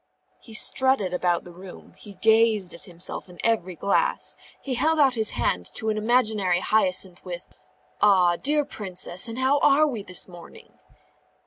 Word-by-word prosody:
He 225 Hz, -, -7 dB
strutted 260 Hz, -6 st, +3 dB
about 175 Hz, -1 st, 0 dB
the 175 Hz, -, -13 dB
room, 185 Hz, +1 st, -13 dB
he 205 Hz, -2 st, -12 dB
gazed 220 Hz, -2 st, +2 dB
at 170 Hz, -, -7 dB
himself 175 Hz, +1 st, -5 dB
in 175 Hz, -, -14 dB
every 190 Hz, -6 st, 0 dB
glass, 345 Hz, -, 0 dB, 0.2 s
he 270 Hz, -, -5 dB
held 315 Hz, +6 st, +1 dB
out 275 Hz, -4 st, +4 dB
his 220 Hz, -3 st, 0 dB
hand 90 Hz, -1 st, -1 dB
to 220 Hz, -, -2 dB
an 215 Hz, -, -1 dB
imaginary 215 Hz, -6 st, +1 dB
Hyacinth 185 Hz, -3 st, +1 dB
with 175 Hz, -1 st, -9 dB, 0.5 s
"Ah, 185 Hz, -4 st, +4 dB
dear 295 Hz, -, 0 dB
Princess, 185 Hz, -, -2 dB
and 230 Hz, +1 st, -7 dB
how 265 Hz, +2 st, +2 dB
are 290 Hz, +2 st, +4 dB
we 250 Hz, -8 st, -3 dB
this 180 Hz, -2 st, +1 dB
morning?" 175 Hz, -2 st, -15 dB
210 Hz, 160 wpm, -24 LUFS, 180-245 Hz, 0.5 s, out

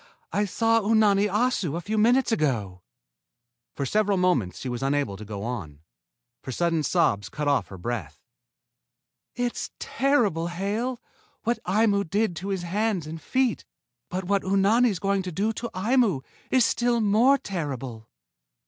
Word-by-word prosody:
I 205 Hz, -, +2 dB
saw 225 Hz, +3 st, +2 dB
Unani 210 Hz, -1 st, +3 dB
Assu 210 Hz, -, 0 dB
a -, -, -2 dB
few 205 Hz, +5 st, -3 dB
minutes 240 Hz, +4 st, +3 dB
ago." 110 Hz, -, -1 dB, 0.9 s
For 140 Hz, -, -2 dB
several 205 Hz, +4 st, +1 dB
moments 140 Hz, -, +1 dB
she -, -, -6 dB
was 120 Hz, 0 st, -3 dB
unable 135 Hz, -6 st, 0 dB
to 105 Hz, -, -9 dB
go 105 Hz, -1 st, -6 dB
on, 85 Hz, -12 st, -5 dB, 0.6 s
for 130 Hz, -, -6 dB
sudden 165 Hz, +3 st, +1 dB
sobs 100 Hz, -7 st, +1 dB
cut 150 Hz, -1 st, -3 dB
off 140 Hz, -2 st, +2 dB
her 95 Hz, -, -10 dB
breath. 90 Hz, -7 st, -5 dB, 1.2 s
"It's 245 Hz, -1 st, -2 dB
terrible, 230 Hz, -, +1 dB
Hale, 210 Hz, +8 st, -2 dB, 0.4 s
what 230 Hz, 0 st, -1 dB
Aimu 200 Hz, -1 st, +2 dB
did 205 Hz, -1 st, +1 dB
to 190 Hz, -, -5 dB
his 190 Hz, -3 st, -2 dB
hands 195 Hz, -1 st, -1 dB
and 160 Hz, +1 st, -7 dB
feet, 255 Hz, -, 0 dB, 0.5 s
but 185 Hz, +1 st, -3 dB
what 200 Hz, +2 st, +1 dB
Unani's 200 Hz, +3 st, +3 dB
going 195 Hz, +2 st, 0 dB
to 185 Hz, -1 st, -5 dB
do 205 Hz, +6 st, 0 dB
to 235 Hz, +2 st, -5 dB
Aimu 210 Hz, -, +2 dB, 0.3 s
is 255 Hz, -3 st, +4 dB
still 240 Hz, 0 st, +1 dB
more 225 Hz, +6 st, +4 dB
terrible." 135 Hz, -, -5 dB
195 Hz, 150 wpm, -26 LUFS, 145-225 Hz, 1.2 s, is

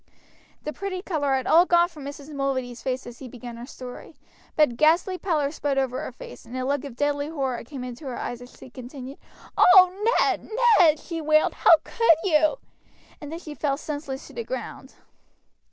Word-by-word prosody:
The 300 Hz, -, -4 dB
pretty 375 Hz, -2 st, -5 dB
color 290 Hz, -8 st, 0 dB
had 260 Hz, -1 st, -2 dB
all 345 Hz, +3 st, +5 dB
gone 345 Hz, 0 st, +4 dB
from 310 Hz, -5 st, -11 dB
Mrs. 285 Hz, +1 st, -8 dB
Mulready's 260 Hz, -3 st, -2 dB
face 260 Hz, 0 st, -3 dB
as 240 Hz, 0 st, -10 dB
he 265 Hz, -, -8 dB
began 240 Hz, -1 st, -9 dB
his 240 Hz, +3 st, -9 dB
story, 255 Hz, +4 st, -10 dB, 0.4 s
but 300 Hz, -3 st, +5 dB
a -, -, -7 dB
ghastly 335 Hz, +7 st, +2 dB
pallor 305 Hz, -7 st, 0 dB
spread 290 Hz, -3 st, -2 dB
over 260 Hz, -2 st, -1 dB
her -, -, -6 dB
face, -, -, -11 dB
and 240 Hz, +2 st, -8 dB
a 255 Hz, -, -2 dB
look 280 Hz, +1 st, -1 dB
of 270 Hz, -4 st, -8 dB
deadly 290 Hz, +1 st, 0 dB
horror 270 Hz, -6 st, -3 dB
came 255 Hz, +1 st, -8 dB
into 250 Hz, +3 st, -8 dB
her 250 Hz, -, -5 dB
eyes 240 Hz, 0 st, -5 dB
as 245 Hz, -, -14 dB
he 255 Hz, -, -13 dB
continued. 255 Hz, +2 st, -9 dB, 0.4 s
"Oh, 375 Hz, +5 st, +6 dB
Ned, -, -, 0 dB, 0.3 s
Ned," 315 Hz, -4 st, +6 dB
she 330 Hz, -2 st, -6 dB
wailed, 310 Hz, 0 st, +3 dB
"how 330 Hz, -, +6 dB
could 460 Hz, -9 st, +3 dB
you!" 315 Hz, +3 st, +3 dB, 0.6 s
and 295 Hz, 0 st, -8 dB
then 325 Hz, -, -5 dB
she 315 Hz, -3 st, -9 dB
fell 285 Hz, -2 st, -1 dB
senseless 285 Hz, -3 st, -6 dB
to -, -, -14 dB
the 470 Hz, -, -4 dB
ground. -, -, -7 dB
285 Hz, 200 wpm, -25 LUFS, 255-325 Hz, 0.6 s, Oh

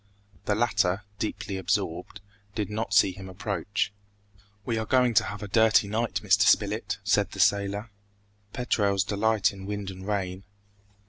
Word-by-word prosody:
The 105 Hz, -, +1 dB
latter, 100 Hz, -4 st, +1 dB, 0.2 s
deeply 100 Hz, -1 st, -3 dB
absorbed, 95 Hz, 0 st, -2 dB, 0.3 s
did 105 Hz, -1 st, -2 dB
not 110 Hz, -1 st, -3 dB
see 100 Hz, -1 st, +5 dB
him 95 Hz, +1 st, -10 dB
approach. 100 Hz, +1 st, -2 dB, 0.7 s
"We 115 Hz, -2 st, -1 dB
are 110 Hz, -, -2 dB
going 125 Hz, -2 st, +3 dB
to -, -, +5 dB
have 105 Hz, 0 st, -6 dB
a -, -, -5 dB
dirty 110 Hz, 0 st, +4 dB
night, 110 Hz, +3 st, -1 dB
Mr. -, -, +4 dB
Spilett!" -, -, +2 dB
said -, -, +2 dB
the -, -, -8 dB
sailor: 100 Hz, +2 st, +1 dB, 0.6 s
"Petrels 100 Hz, -6 st, +1 dB
delight 105 Hz, 0 st, +1 dB
in 95 Hz, 0 st, -9 dB
wind 100 Hz, -1 st, -4 dB
and 95 Hz, +1 st, -10 dB
rain." 95 Hz, -2 st, -2 dB
100 Hz, 150 wpm, -27 LUFS, 95-110 Hz, 0.7 s, see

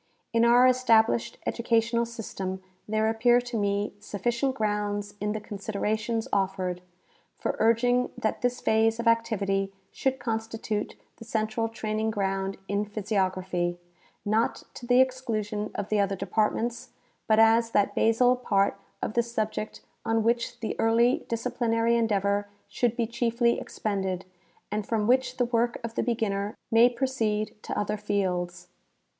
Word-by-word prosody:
In 230 Hz, 0 st, +4 dB
our 240 Hz, +2 st, +6 dB
established 235 Hz, -3 st, +3 dB
educational 235 Hz, 0 st, +1 dB
system 190 Hz, -5 st, -5 dB, 0.2 s
there 215 Hz, +1 st, +1 dB
appear 240 Hz, +2 st, +4 dB
to 240 Hz, -1 st, -7 dB
me 205 Hz, -1 st, 0 dB
sufficient 235 Hz, +6 st, -1 dB
grounds 205 Hz, -2 st, -1 dB
in 210 Hz, 0 st, 0 dB
the 215 Hz, -, -3 dB
considerations 215 Hz, +2 st, -2 dB
offered, 185 Hz, -2 st, 0 dB, 0.6 s
for -, -, -2 dB
urging 245 Hz, +2 st, +3 dB
that 220 Hz, -, -1 dB
this 245 Hz, 0 st, 0 dB
phase 225 Hz, +1 st, +2 dB
of 235 Hz, -, -1 dB
activity 200 Hz, -4 st, +1 dB, 0.2 s
should 265 Hz, -1 st, -1 dB
constitute 225 Hz, -3 st, -3 dB, 0.2 s
the -, -, -10 dB
central 225 Hz, 0 st, -1 dB
training 220 Hz, -1 st, -2 dB
ground 195 Hz, -2 st, -1 dB
in 200 Hz, +1 st, 0 dB
physiography, 190 Hz, -4 st, -1 dB, 0.5 s
not 215 Hz, +2 st, +1 dB
to 240 Hz, -, -9 dB
the 250 Hz, +1 st, +6 dB
exclusion 220 Hz, -5 st, -1 dB
of 205 Hz, 0 st, -3 dB
the 215 Hz, -, +2 dB
other 200 Hz, -1 st, +1 dB
departments, 230 Hz, +4 st, -1 dB, 0.4 s
but 215 Hz, -, +4 dB
as 225 Hz, +1 st, +5 dB
that 205 Hz, -3 st, +2 dB
basal 245 Hz, +3 st, +4 dB
part 200 Hz, -5 st, +1 dB, 0.2 s
of -, -, -2 dB
the 235 Hz, -, +3 dB
subject 220 Hz, -2 st, -3 dB, 0.2 s
on 225 Hz, -1 st, +1 dB
which 235 Hz, +1 st, 0 dB
the 220 Hz, -, -2 dB
early 235 Hz, +3 st, +3 dB
disciplinary 230 Hz, 0 st, +1 dB
endeavor 205 Hz, -3 st, +1 dB, 0.2 s
should 240 Hz, -2 st, 0 dB
be 235 Hz, -, +1 dB
chiefly 235 Hz, +1 st, +1 dB
ex -, -, -10 dB
pended 190 Hz, -3 st, -2 dB, 0.5 s
and 210 Hz, -1 st, -2 dB
from 220 Hz, -2 st, 0 dB
which 255 Hz, +2 st, +2 dB
the 245 Hz, -, +2 dB
work 235 Hz, 0 st, 0 dB
of 230 Hz, -1 st, -4 dB
the -, -, 0 dB
beginner 210 Hz, -4 st, -1 dB
may 230 Hz, +2 st, +7 dB
proceed 235 Hz, -4 st, -1 dB
to -, -, -5 dB
other 210 Hz, +1 st, -1 dB
fields. 180 Hz, -4 st, -2 dB
220 Hz, 145 wpm, -27 LUFS, 205-235 Hz, 0.6 s, may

